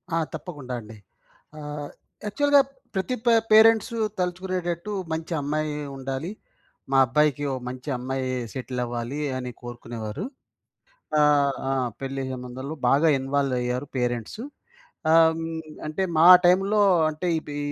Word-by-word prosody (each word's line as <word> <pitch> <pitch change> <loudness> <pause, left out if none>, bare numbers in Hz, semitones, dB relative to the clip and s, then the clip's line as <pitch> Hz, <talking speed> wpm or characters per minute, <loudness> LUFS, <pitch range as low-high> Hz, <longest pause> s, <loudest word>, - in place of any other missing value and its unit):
ఆ! - - +2 0.2
తప్పకుండా 145 -8 -7
అండి. 110 -1 -12 0.6
ఆహ్, 150 -1 -6 0.4
యాక్చువల్‌గా 285 +6 +4 0.3
ప్రతి 195 +7 -1
పే 235 - +5 0.2
పేరెంట్స్ 220 +1 +6 0.3
తలుచుకునేటట్టు 180 0 -2 0.2
మంచి 160 +2 -4
అమ్మాయి 150 +1 -1 0.2
ఉండాలి. 135 +4 -4 0.6
మా 135 - +4
అబ్బాయికి 145 +2 +2
ఒక 130 - -4
మంచి 130 +3 -7
అమ్మాయి 130 +1 -3 0.3
సెటిల్ 125 -1 -4
అవ్వాలి 120 +4 -4 0.2
అని 125 -1 -4
కోరుకునేవారు. 120 - -6 0.9
ఆహ్, 145 -2 +4 0.2
ఆ! - - +1 0.3
పెళ్లి 135 0 -3
సంబంధంలో 130 +4 -6
బాగా 150 +5 +4
ఇన్వాల్వ్ 135 0 0
అయ్యారు 125 +3 -2
పేరెంట్స్. 120 - -2 0.7
ఆహ్, 165 0 +5 0.5
అంటే 155 +5 -2 0.2
మా 165 - +7 0.2
టైమ్‌లో 195 +4 +4 0.3
అంటే 155 +4 -5
ఈ‌పి 145 -2 -7
145 Hz, 120 wpm, -25 LUFS, 130-175 Hz, 0.9 s, మా